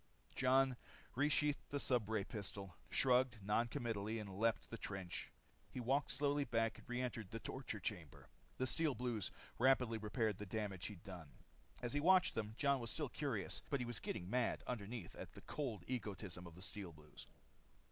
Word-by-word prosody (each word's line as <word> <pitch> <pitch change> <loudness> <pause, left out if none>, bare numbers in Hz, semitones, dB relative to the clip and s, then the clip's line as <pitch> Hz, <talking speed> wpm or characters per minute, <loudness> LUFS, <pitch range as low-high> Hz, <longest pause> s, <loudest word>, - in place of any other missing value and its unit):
Jon 130 0 +5 0.4
resheathed 145 +1 +3
the 145 - 0
stubray 110 -6 +2
pistol, 100 -4 -4
shrugged 125 -2 +4
non 105 +4 +3
committally 115 -4 -1
and 100 -3 -5
leaped 115 -2 +2
the 115 - -3
trench. 95 -3 -4 0.4
He - - -5
walked 130 0 +2
slowly 145 +3 +2
back 115 -4 +1
and - - -17
reentered 125 -4 -1
the 115 - -4
torture 115 -1 -4
chamber. 90 -7 -4 0.3
The 130 - +1
Steel 150 +2 +2
Blues 120 -6 -1 0.3
rapidly 125 -3 +5
repaired 110 -1 0
the 105 - -4
damage 100 -2 -2
he'd 105 -4 -8
done. 90 -7 -8 0.5
As 120 - -1
he 145 - +2
watched 185 +4 +6
them, 110 -1 -2
Jon 140 -2 +4
was 115 -1 -2
still 150 +1 -1
curious, 135 -10 -2
but 140 - +2
he 125 - -1
was 120 -1 -1
getting 90 - -3
mad 125 +3 +1
underneath 115 -1 -4
at - - -8
the - - -10
cold 120 -11 -3
egoism 100 -7 -3
of 85 - -11
the 90 - -8
Steel 100 -3 -4
Blues. 75 -1 -12
115 Hz, 175 wpm, -41 LUFS, 100-130 Hz, 0.5 s, watched